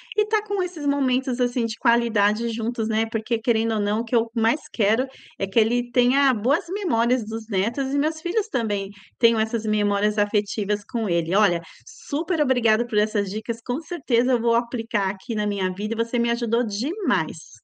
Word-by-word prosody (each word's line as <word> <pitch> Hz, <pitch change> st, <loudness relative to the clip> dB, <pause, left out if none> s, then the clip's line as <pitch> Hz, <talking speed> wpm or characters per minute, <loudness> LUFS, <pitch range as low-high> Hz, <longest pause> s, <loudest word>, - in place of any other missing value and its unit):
e 425 Hz, -, +4 dB
tá 430 Hz, -1 st, +1 dB
com 405 Hz, -2 st, -1 dB
esses 350 Hz, -5 st, -5 dB
momentos 260 Hz, -2 st, +1 dB
assim 245 Hz, -1 st, +1 dB
de 220 Hz, -, -4 dB
qualidade 235 Hz, -2 st, +2 dB
juntos, 225 Hz, 0 st, -2 dB
né. 220 Hz, 0 st, 0 dB
Porque 225 Hz, +1 st, -1 dB
querendo 225 Hz, -1 st, +1 dB
ou 215 Hz, -, 0 dB
não 205 Hz, +2 st, 0 dB
o 235 Hz, -, -6 dB
que 235 Hz, -, -2 dB
eu 230 Hz, 0 st, +2 dB
mais 230 Hz, +6 st, +2 dB
quero, 225 Hz, +4 st, +2 dB, 0.3 s
é 195 Hz, -, -1 dB
que 195 Hz, +4 st, +2 dB
ele 240 Hz, +2 st, +1 dB
tenha 260 Hz, +3 st, +4 dB
boas 255 Hz, +11 st, +1 dB
memórias 255 Hz, -, +1 dB
dos 220 Hz, 0 st, -7 dB
netos 235 Hz, +8 st, -1 dB
e 285 Hz, -, 0 dB
meus 315 Hz, +2 st, 0 dB
filhos 390 Hz, +5 st, -1 dB
também 205 Hz, -, -2 dB, 0.3 s
tenham 230 Hz, -2 st, +4 dB
essas 220 Hz, 0 st, -1 dB
memórias 210 Hz, 0 st, +1 dB
afetivas 205 Hz, 0 st, 0 dB
com 225 Hz, -4 st, -3 dB
ele. 170 Hz, +1 st, 0 dB
Olha, 195 Hz, -5 st, +4 dB, 0.3 s
super 320 Hz, +3 st, -3 dB
obrigada 240 Hz, -5 st, +3 dB
por 220 Hz, -3 st, 0 dB
essas 210 Hz, -2 st, 0 dB
dicas, 220 Hz, +2 st, -4 dB
com 255 Hz, +6 st, -2 dB
certeza 260 Hz, -7 st, 0 dB
eu 240 Hz, -, +3 dB
vou 235 Hz, 0 st, +2 dB
aplicar 230 Hz, -4 st, -1 dB
aqui 195 Hz, +4 st, -6 dB
na 210 Hz, -1 st, -1 dB
minha 190 Hz, -2 st, -1 dB
vida 215 Hz, +4 st, -4 dB
e -, -, -9 dB
você 240 Hz, +1 st, -2 dB
me 235 Hz, 0 st, +1 dB
ajudou 235 Hz, 0 st, +1 dB
demais. 260 Hz, -, -2 dB
230 Hz, 195 wpm, -23 LUFS, 210-255 Hz, 0.3 s, e